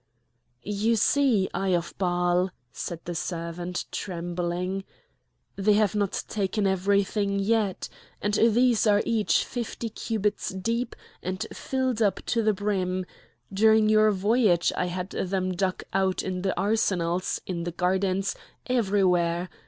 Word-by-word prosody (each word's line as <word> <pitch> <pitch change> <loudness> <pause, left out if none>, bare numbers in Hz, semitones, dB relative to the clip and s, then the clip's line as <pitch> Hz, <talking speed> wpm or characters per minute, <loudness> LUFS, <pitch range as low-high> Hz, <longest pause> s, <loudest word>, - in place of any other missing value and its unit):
"You 210 +3 +1
see, 225 -3 +3
Eye 190 -2 +1
of 170 -1 -3
Baal," 180 0 +2 0.2
said 170 -1 -5
the 175 - -3
servant, 170 +1 -4
trembling, 175 +1 -3 0.7
"they 205 +2 +3
have 210 -1 +3
not 205 -2 -1
taken 205 0 -1
everything 200 +1 +1
yet! 205 -1 0 0.3
and 205 +1 -1
these 235 +1 +4
are 205 0 +4
each 225 -3 +2
fifty 235 -1 -4
cubits 215 -1 -2
deep 230 +6 -2 0.3
and 185 0 -3
filled 260 -3 -1
up 205 -3 +2
to 230 - +1
the 215 -1 +3
brim! 190 -2 -1 0.5
During 220 +1 +5
your 215 0 +5
voyage 205 -2 +2
I 180 - 0
had 180 +1 -4
them 185 0 -1
dug 185 0 -1
out 190 -1 +1
in 185 -1 -3
the 190 0 -1
arsenals, 185 -4 0
in 170 -2 -3
the 175 - -3
gardens, 190 +2 0 0.3
everywhere! 185 -7 +1
195 Hz, 130 wpm, -26 LUFS, 180-215 Hz, 0.7 s, During